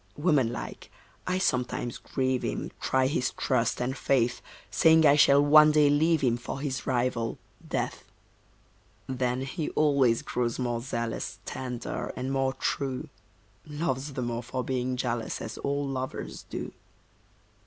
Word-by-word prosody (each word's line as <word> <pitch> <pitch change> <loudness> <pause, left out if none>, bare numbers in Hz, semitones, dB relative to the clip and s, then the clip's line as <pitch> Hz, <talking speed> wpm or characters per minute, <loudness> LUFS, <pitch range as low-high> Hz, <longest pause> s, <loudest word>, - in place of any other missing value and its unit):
Woman 145 -7 +2
like, 120 - -7 0.4
I 185 0 +1
sometimes 125 -8 -1
grieve 130 -1 -1
him, - - -3
Try 130 0 +2
his 130 -2 +1
trust 120 -3 +1
and 125 +2 -1
faith, 125 -2 +1 0.3
Saying 160 -1 +5
I 145 -1 +7
shall 145 -1 +6
one 150 +1 +8
day 150 -1 +5
leave 160 +2 +3
him 120 -3 +2
For 125 +3 -6
his 135 -2 -3
rival, 120 -2 0 0.3
Death. - - -2 1.0
Then 125 -1 -1
he 150 +4 -3
always 140 -6 +3
grows 120 -2 -1
more 120 -2 -1
zealous, 115 -2 -3
Tender, 125 -2 -4
and 130 +1 -3
more 135 -1 +1
true; 135 +2 -2 0.6
Loves 145 -2 -2
the 130 -2 -3
more 120 0 -2
for 125 +1 -4
being 130 -1 -1
jealous, 120 -2 -2
As 110 - -6
all 140 0 -1
lovers 130 -1 -5
do. - - -5
130 Hz, 145 wpm, -28 LUFS, 125-145 Hz, 1.0 s, one